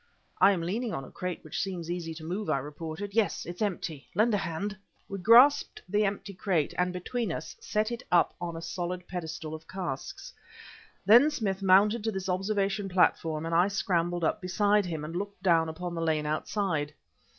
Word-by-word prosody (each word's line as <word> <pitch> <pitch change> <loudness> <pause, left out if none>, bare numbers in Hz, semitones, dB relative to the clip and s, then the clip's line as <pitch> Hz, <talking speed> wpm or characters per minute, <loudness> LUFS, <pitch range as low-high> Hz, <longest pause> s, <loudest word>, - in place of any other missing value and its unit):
"I 200 - +7
am 175 -4 -1
leaning 215 +3 -2
on 135 - -4
a - - -13
crate 180 -2 -5
which 155 - -3
seems 175 -3 -4
easy 165 -2 -4
to 160 - -9
move," 180 +4 -3
I 155 - +2
reported. 160 +7 -6
"Yes, 220 -2 +1
it's 175 +3 -8
empty. 170 -8 -3
Lend 220 +4 +3
a - - +3
hand." 195 +3 -3 0.3
We 195 - -5
grasped 235 +9 +6
the 210 +3 +2
empty 200 0 -3
crate, 180 -5 0
and 180 0 +1
between 190 +4 -3
us, - - -6
set 215 +2 -1
it 235 0 -4
up 175 - +4
on 170 -1 -4
a 165 - -7
solid 180 +1 -4
pedestal 160 -3 -5
of 160 0 -9
casks. 175 -8 -6 0.7
Then 240 +9 +7
Smith 205 -10 -2
mounted 200 +4 +4
to 220 - +1
this 190 -1 -4
observation 195 +1 0
platform 165 -3 +2
and 165 - -3
I 175 +3 +5
scrambled 175 -3 0
up 185 +6 0
beside 200 +2 +2
him, 160 -3 -4
and 165 +2 -7
looked 200 0 -5
down 165 -3 +3
upon 175 +2 -5
the 165 - -3
lane 155 -2 0
outside. 155 -1 -1
180 Hz, 195 wpm, -29 LUFS, 165-205 Hz, 0.7 s, I